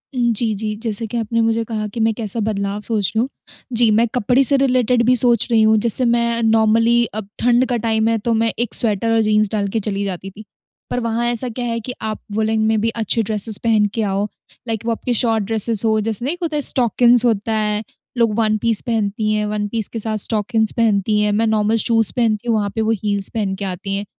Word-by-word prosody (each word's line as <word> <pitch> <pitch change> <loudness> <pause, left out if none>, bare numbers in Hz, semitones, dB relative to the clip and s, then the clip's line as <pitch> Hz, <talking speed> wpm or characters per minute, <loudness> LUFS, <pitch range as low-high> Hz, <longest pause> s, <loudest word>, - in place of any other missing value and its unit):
हुँ, 240 -1 +1
जी, 220 0 +1
जी। 215 +1 -4
जैसे 225 0 -3
कि 235 +2 -5
आपने 230 +1 -1
मुझे 225 0 0
कहा 220 -1 -4
कि 220 +3 -8
मैं 225 0 +2
कैसा 220 0 -2
बदलाव 205 -1 -2
सोच 210 -3 -1
रही - - +2
हूँ। 250 +4 0 0.4
जी, 230 -1 +4
मैं 225 +3 +3
कपड़े 250 +3 +2
से 280 +2 +6
रिलेटेड 250 -3 +1
भी 250 +1 +4
सोच 240 -2 +4
रही 225 -1 +4
हूँ, 220 0 +4
जैसे 235 +3 +2
मैं 235 0 +1
नॉर्मली 225 +2 +3
अब 215 -2 -6
ठंड 245 +1 +2
का 245 - 0
टाइम 220 0 0
है, 230 0 +1
तो 230 +2 -2
मैं 225 0 +1
एक 240 -2 -2
स्वेटर 225 0 +2
और - - +3
जीन्स 215 -1 +1
डाल 205 -2 -1
के 225 - +2
चली 200 -1 -3
जाती 195 0 -5
थी। 215 +2 -13 0.4
पर 245 - -2
वहाँ 230 0 -2
ऐसा 240 +1 +1
क्या 245 +2 -5
है 230 -1 -2
कि 250 +3 -6
आप 215 -1 -4
वूलेन 220 +1 0
में 220 -1 +1
भी 230 - +1
अच्छे 225 0 -1
ड्रेसेज़ 210 0 +2
पहन 220 -3 +2
के 225 - -1
आओ, 200 0 -1 0.4
लाइक 225 0 -4
वो 230 - 0
आपके 240 +2 -2
शॉर्ट 225 -2 +1
ड्रेसेज़ 225 +1 0
हो, 220 -1 +2
जैसे 225 +2 -2
नहीं 290 - -1
एक 355 - -10
होता 310 -2 -2
है 295 - 0
स्टॉकिन्स 245 -1 +3
होता 220 -1 0
है, 210 0 -1 0.3
लोग 230 -3 +2
वन 215 -1 +1
पीस 230 -2 +3
पहनती 215 -1 -1
हैं, 210 0 0
वन 210 0 -3
पीस 220 -1 -2
के 225 - -6
साथ 215 0 -2
स्टॉकिन्स 220 +1 0
पहनती 210 -2 +1
हैं, 210 0 +1
मैं 220 +2 +1
नॉर्मल 215 0 +1
शूज़ 225 -2 +4
पहनती 230 -1 0
हूँ, 230 - +2
वहाँ 205 -1 -1
पे 225 - -1
वो 220 - 0
हील्स 200 -2 +2
पहन 205 -4 -2
के 200 0 -5
आती 190 +1 -5
हैं। 200 +1 -4
220 Hz, 240 wpm, -18 LUFS, 210-235 Hz, 0.4 s, से